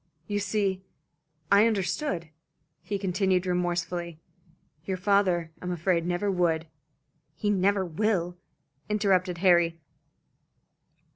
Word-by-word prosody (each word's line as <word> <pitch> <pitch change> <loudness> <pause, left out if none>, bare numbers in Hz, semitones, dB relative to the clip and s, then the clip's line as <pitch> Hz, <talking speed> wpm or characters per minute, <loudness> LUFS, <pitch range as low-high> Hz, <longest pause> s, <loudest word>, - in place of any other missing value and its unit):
"You 205 -1 -2
see, 200 -2 -1 0.7
I 200 +3 +6
understood," 195 - -1 0.5
he 200 +4 -3
continued 190 -1 +1
remorsefully. 175 -2 -2 0.6
"Your 185 +2 -3
father, 185 -4 +2
I - - -7
am 180 - -2
afraid, 175 0 0
never 180 +3 0
would." 170 -3 +1 0.7
"He 205 +6 0
never 195 0 +2
will," 180 0 -1 0.5
interrupted 190 -4 +1
Harry. 170 -2 +4
185 Hz, 100 wpm, -27 LUFS, 175-200 Hz, 0.7 s, I